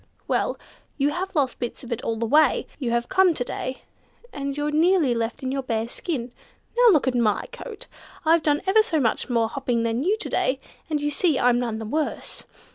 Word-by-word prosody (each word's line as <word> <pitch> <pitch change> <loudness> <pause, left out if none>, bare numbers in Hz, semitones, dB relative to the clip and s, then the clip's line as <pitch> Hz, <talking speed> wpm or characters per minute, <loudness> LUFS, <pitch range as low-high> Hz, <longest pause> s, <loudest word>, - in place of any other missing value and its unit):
Well, - - 0 0.4
you 285 0 +2
have 375 +4 -4
lost 275 -4 +1
bits 240 +1 -5
of 245 - -9
it 235 - -2
all 230 - -1
the 230 +1 -2
way 295 +3 +4
you 255 -5 -1
have 235 0 0
come 380 -3 +4
to 245 - -1
day, 255 +1 -5 0.5
and 280 0 -4
you're 295 0 -1
nearly 320 -3 +3
left 230 +3 -3
in 260 - -1
your 275 0 -1
bare 230 -3 -2
skin. 250 -2 -4 0.4
Now 485 -1 +7
look 300 -7 +3
at 260 - +2
my 230 -4 +1
coat. - - -7 0.4
I've 330 +1 +5
done 295 0 +1
ever 400 +3 +5
so 355 -8 0
much 240 0 0
more 230 -2 +2
hopping 245 -2 -1
than 230 +3 0
you 400 +6 +2
to 440 - -5
day, 260 +1 +1 0.3
and 305 -2 0
you 295 0 -1
see 305 0 +2
I'm 245 -1 +3
none 235 -3 -2
the 220 - -5
worse. 300 +8 -3
275 Hz, 215 wpm, -24 LUFS, 235-315 Hz, 0.5 s, Now